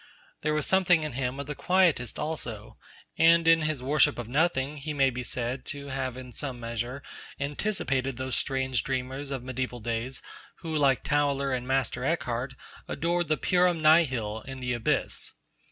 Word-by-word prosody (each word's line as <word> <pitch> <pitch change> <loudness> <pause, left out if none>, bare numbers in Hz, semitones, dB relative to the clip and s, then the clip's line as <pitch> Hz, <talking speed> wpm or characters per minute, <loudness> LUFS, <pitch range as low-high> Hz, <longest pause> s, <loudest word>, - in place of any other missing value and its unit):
There 150 0 0
was 150 - +1
something 180 -4 +4
in 155 - -3
him 130 +1 -2
of 140 - -3
the 150 - -4
Quietist 150 - +2
also; 120 -9 -5 0.4
and 165 0 +6
in 165 0 +6
his 155 -4 -1
worship 150 +2 +3
of 120 -2 -5
Nothing 145 +1 +1
he 150 +1 -4
may 135 -1 +4
be 125 +1 -4
said 125 +1 -3
to 140 -1 -6
have 130 -2 -3
in 130 -1 -8
some 130 -2 -5
measure 120 +3 -4 0.4
anticipated 140 - -1
those 130 -1 -2
strange 130 -3 0
dreamers 135 +1 -3
of 135 -3 -4
mediaeval 130 -1 -4
days 115 +3 -3 0.4
who, 160 -2 -4
like 140 -4 +3
Tauler 140 -2 +1
and 125 0 -5
Master 130 -2 0
Eckhart, 130 -4 -1 0.3
adored 170 0 0
the 155 0 +2
purum 180 -2 +3
nihil 130 -9 +4
and 130 -1 -6
the 125 0 0
Abyss. 120 -2 -1
135 Hz, 170 wpm, -28 LUFS, 125-155 Hz, 0.4 s, and